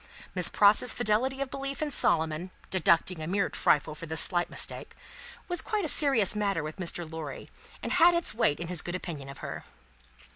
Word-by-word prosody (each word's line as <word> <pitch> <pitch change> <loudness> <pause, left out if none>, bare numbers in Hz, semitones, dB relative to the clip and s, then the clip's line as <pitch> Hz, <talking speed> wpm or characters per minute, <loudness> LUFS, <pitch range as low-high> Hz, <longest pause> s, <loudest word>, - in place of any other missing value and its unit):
Miss - - +1
Pross's 210 +4 +4
fidelity 245 +4 0
of 275 -2 -3
belief 275 0 -5
in 305 -1 -2
Solomon 160 - +2 0.2
(deducting 185 -2 +1
a 155 - -5
mere 195 +2 0
trifle 150 0 +1
for 165 +2 -9
this 160 +1 +1
slight 175 -2 +3
mistake) - - -6 0.5
was 355 -1 +1
quite 420 -4 -2
a - - -1
serious 270 - +3
matter 200 -6 -1
with 155 +3 -7
Mr. 175 -2 -4
Lorry, 155 -4 -8 0.4
and - - -3
had 350 0 +5
its 340 - 0
weight 210 -10 +1
in 170 - -5
his 175 -1 -1
good 175 - -5
opinion 155 -7 -7
of 135 - -10
her. - - -6
190 Hz, 190 wpm, -28 LUFS, 160-265 Hz, 0.5 s, had